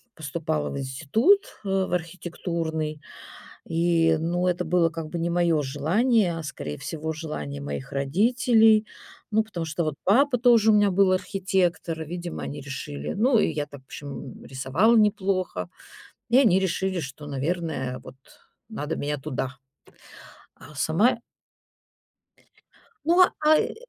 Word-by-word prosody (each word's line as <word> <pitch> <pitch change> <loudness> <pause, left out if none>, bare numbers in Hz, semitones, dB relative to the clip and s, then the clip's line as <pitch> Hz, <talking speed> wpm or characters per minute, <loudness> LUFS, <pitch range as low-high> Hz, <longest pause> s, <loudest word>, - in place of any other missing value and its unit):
поступала 155 0 -3
в - - -5
институт, 155 - +2 0.3
э, - - -3 0.2
в - - -9
архитектурный. 165 -3 -3 0.6
И, 165 -1 +2
ну, 175 +2 0
это 180 0 0
было, 170 0 +3
как 165 -1 -6
бы, 170 +2 -4
не 170 +1 -1
моё 170 -3 +2
желание, 185 - +1
а, - - -5
скорее 110 - -6
всего, 160 0 -4
желание 75 - -6
моих 70 -1 -5
родителей. 220 - +3 0.4
Ну, 220 +1 +3
потому 180 -6 -5
что, 160 +1 -2
вот, 155 - -2
папа 255 +6 +4
тоже 235 -2 +5
у - - +5
меня 205 -1 +4
был 190 0 +4
архитектор. 185 -4 -1
Видимо, 175 +2 -6
они 145 +1 -5
решили 75 - -6
ну, 235 +3 +3
и - - +3
я 150 -1 -3
так, 140 -1 -12
в - - -36
общем, 140 -1 -9
рисовала 135 - +2
неплохо. 190 - +1 0.6
И 245 - +6
они 200 -8 +5
решили, 190 0 -1
что, 145 0 -8
наверное, 145 -2 -3
вот, - - -10 0.5
надо 160 -8 -4
меня 145 +1 -2
туда. 135 -1 -4 1.0
А 155 +3 -14
сама 160 - +3
я 235 - -5 1.8
Но, 350 +3 +6 0.2
ай, 310 0 +4
170 Hz, 140 wpm, -25 LUFS, 150-200 Hz, 1.8 s, И